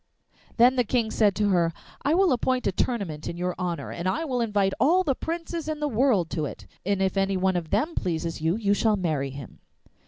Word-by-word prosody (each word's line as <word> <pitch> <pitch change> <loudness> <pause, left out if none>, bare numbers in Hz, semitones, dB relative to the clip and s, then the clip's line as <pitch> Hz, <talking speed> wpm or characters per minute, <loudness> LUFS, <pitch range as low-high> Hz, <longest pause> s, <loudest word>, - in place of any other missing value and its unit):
Then 250 +2 +5
the 250 - +4
King 230 -1 0
said 205 -3 +3
to 205 +1 +1
her, 170 -3 +2 0.3
'I 295 +3 +2
will 380 -1 +4
appoint 255 0 0
a - - +2
tournament 185 -8 -2
in 170 - -5
your 180 +1 -1
honour, 175 -2 -3
and 175 +1 -4
I 215 +12 -1
will 250 -5 -1
invite 205 -4 +1
all 355 +7 +4
the 280 - +1
princes 330 +2 -4
in 310 -1 -3
the 300 - 0
world 230 - +2
to 155 -3 -1
it, - - -8 0.2
and 195 0 0
if 190 +1 0
any 195 0 +1
one 190 0 +1
of 170 -3 -2
them 320 +3 0
pleases 165 - -2
you, 160 +3 +1
you 205 -2 +1
shall 215 +1 +2
marry 155 -8 -1
him. 135 -1 -10
200 Hz, 225 wpm, -26 LUFS, 175-255 Hz, 0.3 s, Then